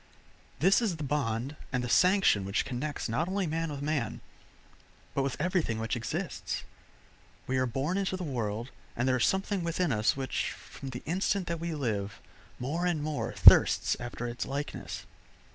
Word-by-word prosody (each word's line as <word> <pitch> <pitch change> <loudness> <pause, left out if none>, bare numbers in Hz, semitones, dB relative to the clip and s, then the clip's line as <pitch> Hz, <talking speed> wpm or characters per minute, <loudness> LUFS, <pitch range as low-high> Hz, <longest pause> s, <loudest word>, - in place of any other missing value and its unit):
This 190 - +4
is 210 -7 0
the 155 - -6
bond 135 -2 -1 0.2
and 125 -2 0
the - - -2
sanction 180 - +4
which 100 +2 0
connects 135 +3 -3
not 140 +9 0
only 195 0 0
man 165 0 -1
with 145 -1 -5
man, 145 -6 -1 0.9
but 140 - +1
with 135 -1 -2
everything 170 - 0
which 115 +2 -1
exists. 120 - -3 0.8
We 130 0 0
are 130 - +2
born 140 - -1
into 190 -1 -1
the 185 - -5
world, 120 -4 -3 0.2
and 120 +2 0
there 130 -1 +3
is 120 - +3
something 195 -1 0
within 170 -1 0
us 110 +2 +2
which, 135 -1 -2
from 135 - -9
the 125 -1 -7
instant 190 +3 0
that 170 -1 -3
we 170 -1 -3
live, 105 -8 -2 0.4
more 160 +8 -1
and 160 -4 0
more 150 -1 -2
thirsts - - +7
after 120 0 -5
its 120 +1 -4
likeness. 140 +2 -5
145 Hz, 175 wpm, -30 LUFS, 120-170 Hz, 0.9 s, thirsts